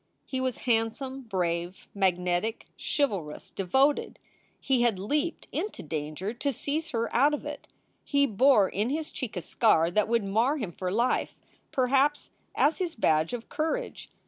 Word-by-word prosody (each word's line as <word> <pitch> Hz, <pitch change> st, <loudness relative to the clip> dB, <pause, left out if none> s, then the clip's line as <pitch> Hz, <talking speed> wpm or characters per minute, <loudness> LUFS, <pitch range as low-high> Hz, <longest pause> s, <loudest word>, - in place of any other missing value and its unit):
He 260 Hz, -1 st, -3 dB
was 255 Hz, -2 st, -1 dB
handsome, 245 Hz, +3 st, 0 dB
brave, 175 Hz, -3 st, -2 dB
magnetic, 180 Hz, +2 st, 0 dB, 0.3 s
chivalrous, 195 Hz, -, -1 dB
devoted. 265 Hz, +10 st, +1 dB, 0.4 s
He 265 Hz, -3 st, +1 dB
had 235 Hz, -5 st, +2 dB
leaped 295 Hz, -, -1 dB
into 420 Hz, -, -3 dB
danger 155 Hz, +6 st, -4 dB
to 280 Hz, +4 st, -1 dB
seize 295 Hz, +5 st, -3 dB
her 230 Hz, -5 st, -2 dB
out 285 Hz, +5 st, +5 dB
of -, -, -9 dB
it. -, -, -7 dB, 0.4 s
He 280 Hz, -1 st, +3 dB
bore 225 Hz, -3 st, +4 dB
in 210 Hz, +6 st, -1 dB
his 310 Hz, +2 st, -2 dB
cheek 230 Hz, -8 st, -5 dB
a 175 Hz, -, -3 dB
scar 165 Hz, +2 st, +3 dB
that 210 Hz, +3 st, +2 dB
would 230 Hz, -1 st, +2 dB
mar 225 Hz, +9 st, +2 dB
him 215 Hz, -10 st, -4 dB
for 180 Hz, +2 st, -4 dB
life, 235 Hz, +5 st, +1 dB, 0.4 s
perhaps, 270 Hz, +3 st, +2 dB, 0.2 s
as 300 Hz, +6 st, +3 dB
his 355 Hz, -3 st, -2 dB
badge 160 Hz, -7 st, +2 dB
of 245 Hz, -2 st, -5 dB
courage. 325 Hz, +12 st, -3 dB
230 Hz, 155 wpm, -28 LUFS, 190-280 Hz, 0.4 s, out